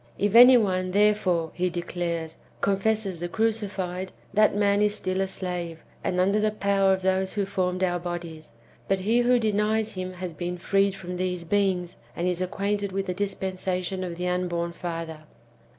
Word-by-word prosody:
If 205 0 0
any 250 +2 +10
one, 185 -4 +1
therefore, 190 -4 +2
he 180 0 0
de 175 0 -3
clares, 170 -2 -3 0.2
confesses 200 -2 0
the 175 +1 -3
crucified, 195 -4 -2 0.2
that 215 0 +4
man 205 0 +3
is 210 0 +2
still 185 -1 -1
a 195 - 0
slave, 175 -3 -5 0.2
and 180 - 0
under 200 +3 +3
the 215 0 +2
power 200 -2 +2
of 190 -1 0
those 190 0 +1
who 205 -2 0
formed 185 -1 -1
our 175 -1 +1
bodies; 170 -3 -6 0.3
but 195 - +2
he 225 +5 +2
who 245 +1 +4
denies 215 0 +1
him 185 0 -5
has 180 -1 -6
been 175 +2 -4
freed 195 +2 +1
from 180 -1 -6
these 180 -1 -2
beings, 185 -1 0 0.2
and 175 - -1
is 180 0 -1
acquainted 200 +2 -1
with 195 +1 -2
the 180 - -2
dispensation 190 -1 -2
of 175 -2 -4
the 180 +1 -3
unborn 175 -1 -1
father. 165 -2 -5
185 Hz, 180 wpm, -26 LUFS, 180-200 Hz, 0.3 s, any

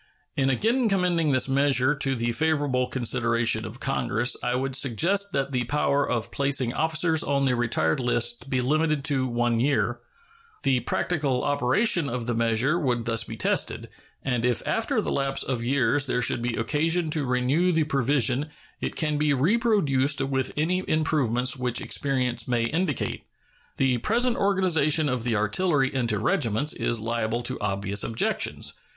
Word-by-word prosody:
In 135 -1 +1
again 230 - +1
commending 175 -5 +1
this 130 -1 +2
measure 135 0 +2
to 135 -2 -1
the 120 0 -1
favorable 145 -2 0
consideration 115 -2 0
of 110 +4 -9
Congress 125 -3 0
I 125 0 0
would 130 0 -1
suggest 170 - +1
that 140 0 -1
the 125 -2 -1
power 145 +1 0
of 115 -5 -2
placing 135 -3 0
officers 160 0 +2
on 140 -1 0
the 130 -2 +2
retired 115 -10 0
list 120 +1 -1
be 130 -1 0
limited 155 +2 0
to 135 -3 +1
one 120 -1 0
year. 140 +4 0 0.6
The 130 -2 +2
practical 135 +1 -1
operation 145 - +1
of 120 -1 -4
the 120 - -1
measure 115 +7 +1
would 125 -6 -1
thus 115 -1 +1
be 110 - -8
tested, - - -1 0.3
and 125 -3 -1
if 125 -1 0
after - - 0
the - - -3
lapse 135 0 -1
of 125 -3 -3
years 135 +2 +1
there 125 -1 0
should 120 - +1
be 120 0 -2
occasion 160 +7 0
to 150 -1 +1
renew 130 +8 +1
the 160 -2 +2
provision 140 -1 0 0.3
it - - -4
can 150 -2 -1
be 150 -1 +2
reproduced 155 - +2
with 135 -1 -1
any 180 +5 0
improvements 130 -6 +1
which 125 -2 -1
experience 130 -4 -1
may 120 -2 0
indicate. 155 +3 -2 0.5
The 130 -2 +1
present 240 - 0
organization 165 -6 +2
of 125 -2 -1
the 120 -2 0
artillery 135 - +1
into 120 -5 0
regiments 115 +6 0
is 120 - -2
liable 115 +1 -2
to - - -2
obvious 100 0 -1
objections. 115 0 0
135 Hz, 160 wpm, -25 LUFS, 120-150 Hz, 0.6 s, this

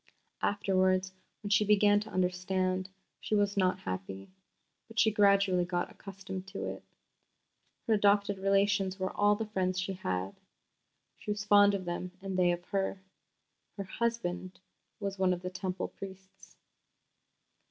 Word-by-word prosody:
Afterwards, 190 -2 +1 0.3
when 205 - -4
she 205 +1 +5
began 205 0 +4
to 215 +1 -7
understand, 185 0 0 0.3
she 215 - -1
was 205 0 +2
not 185 -2 +1
happy, 95 - -6 0.6
but 225 - -14
she 220 - +5
gradually 200 -3 +4
got 175 0 -2
accustomed 190 -1 -8
to 195 +1 -5
it. - - -6 1.0
Her 225 - +2
adopted 200 -1 +3
relations 195 0 +2
were 185 0 -3
all 205 0 +4
the 225 +1 -3
friends 185 -3 -1
she 185 +1 -2
had. 95 - -3 0.8
She - - -9
was 210 0 -2
fond 205 -1 +6
of 190 -2 -4
them 175 +1 -4
and 195 -1 -5
they 180 -1 +4
of 175 0 -4
her. 195 -1 -1 0.8
Her 200 - -3
"husband" 190 -4 -3 0.4
was 200 -2 -4
one 185 -1 +3
of 175 0 -6
the 180 - -4
Temple 185 0 -3
priests. 190 -1 -12
190 Hz, 145 wpm, -31 LUFS, 185-205 Hz, 1.0 s, fond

